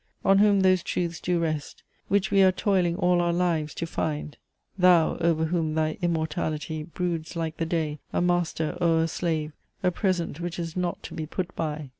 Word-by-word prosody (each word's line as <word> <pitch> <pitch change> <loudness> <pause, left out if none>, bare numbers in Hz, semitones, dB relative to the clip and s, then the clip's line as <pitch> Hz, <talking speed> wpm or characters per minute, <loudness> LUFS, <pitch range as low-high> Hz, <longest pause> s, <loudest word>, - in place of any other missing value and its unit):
On 195 0 +5
whom 205 -1 +5
those 185 -1 +4
truths 170 -1 -2
do 180 0 0
rest, 155 -3 -3 0.2
Which 200 +1 +1
we 200 -1 +5
are 190 -1 +6
toiling 185 -3 +1
all 180 -1 +2
our 175 0 +1
lives 170 -4 0
to 170 - -3
find! 150 -2 -3 0.4
Thou, 180 -3 +4
over 165 -1 +1
whom 160 -2 -1
thy 155 0 0
Immortality 160 -2 -2
Broods 170 +1 -4
like 165 -1 -3
the 165 - -1
Day, 155 -3 -1
a - - 0
Master 175 -2 0
o'er 165 -1 +3
a - - +1
Slave, 160 -2 -2 0.3
A 180 - +3
Present 175 -4 -1
which 175 -1 -4
is 165 -1 -4
not 180 -1 -2
to - - -8
be 155 -2 -4
put 180 +2 -4
by!" 150 -3 -3
170 Hz, 190 wpm, -26 LUFS, 160-180 Hz, 0.4 s, are